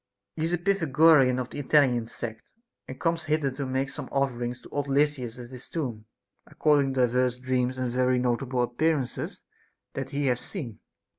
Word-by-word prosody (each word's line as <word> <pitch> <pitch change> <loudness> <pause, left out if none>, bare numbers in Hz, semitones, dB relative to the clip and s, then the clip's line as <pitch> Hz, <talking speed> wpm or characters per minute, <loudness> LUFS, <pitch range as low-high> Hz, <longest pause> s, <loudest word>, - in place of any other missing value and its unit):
He 160 - -1
is 165 - -1
a - - +3
Pythagorean 160 -7 +4
of 125 -1 -4
the - - -6
Italian 130 -5 +3
sect, 115 -1 -7 0.4
and 130 - -8
comes 165 -1 0
hither 150 -3 +1
to 135 +1 -4
make 130 +1 0
some 140 - -8
offerings 125 -2 -1
to - - -14
old 145 -1 -2
Lysis 135 -4 +1
at 120 0 -9
his 125 -1 -8
tomb, 120 -10 -4 0.4
according 145 -3 +2
to 130 - +2
divers 125 0 +2
dreams 130 0 -1
and 130 -2 -1
very 125 +1 +2
notable 125 +1 0
appearances 135 +2 -1 0.5
that 135 -1 -4
he 145 0 -1
hath 125 -2 +2
seen. 125 - -7
130 Hz, 175 wpm, -27 LUFS, 125-145 Hz, 0.5 s, Pythagorean